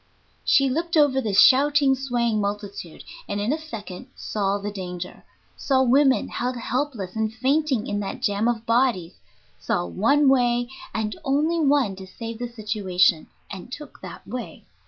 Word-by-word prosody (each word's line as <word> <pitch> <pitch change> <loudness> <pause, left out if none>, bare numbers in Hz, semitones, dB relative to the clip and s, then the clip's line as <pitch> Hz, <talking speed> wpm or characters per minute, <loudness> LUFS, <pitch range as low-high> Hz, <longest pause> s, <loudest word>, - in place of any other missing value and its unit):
She 275 -1 +4
looked 330 +5 -1
over 280 -3 +4
the 220 - -2
shouting, 280 +5 +5
swaying 240 -5 0
multitude, 200 -4 -5 0.3
and 205 - -2
in 215 +7 0
a 315 - -4
second 210 -11 -8
saw 200 -1 -1
the 205 +1 -5
danger 180 -2 -7 0.3
saw 265 -2 +2
women 265 +1 +3
held 250 +1 -2
helpless 240 -6 -3
and 220 -1 -1
fainting 265 0 0
in 205 - -2
that 205 +6 -4
jam 210 -2 0
of 230 -1 -1
bodies; 230 -8 +1 0.5
saw 90 - -1
one 280 - +2
way, 245 -2 +3 0.2
and 215 -1 -2
only 305 +4 +1
one, 280 -9 +2
to 190 -1 -9
save 230 +3 -7
the 245 - -3
situation, 200 -7 +1 0.2
and 195 +5 -8
took 300 +3 -9
that - - -10
way. 250 -1 -7
235 Hz, 155 wpm, -24 LUFS, 205-270 Hz, 0.5 s, shouting